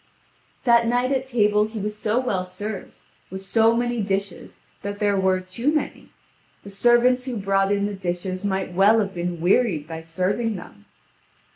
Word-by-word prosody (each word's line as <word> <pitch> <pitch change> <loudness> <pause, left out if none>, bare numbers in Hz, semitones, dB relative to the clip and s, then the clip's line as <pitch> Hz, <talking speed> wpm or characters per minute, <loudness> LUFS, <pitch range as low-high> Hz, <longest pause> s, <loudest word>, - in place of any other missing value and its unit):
That 235 -2 +4
night 245 +2 +1
at 265 -1 0
table 210 -4 +3
he 220 +1 -8
was 210 +1 -3
so 215 +2 0
well 200 -8 -1
served 200 +3 -6 0.4
with 190 0 -6
so 225 +4 +3
many 240 -1 0
dishes 195 -2 -4 0.2
that 205 0 -5
there 205 -1 +1
were 190 -1 +2
too 185 +10 -2
many. 305 -1 -3 0.5
The 200 - -10
servants 240 +4 +3
who 250 -3 -3
brought 195 0 +1
in 200 0 +1
the 205 - -3
dishes 185 0 -4
might 190 -2 -2
well 200 +5 +5
have 200 -3 -1
been 175 -1 -3
wearied 175 -3 +2
by 160 0 -6
serving 185 +7 -1
them. 100 - -11
205 Hz, 170 wpm, -23 LUFS, 185-230 Hz, 0.5 s, well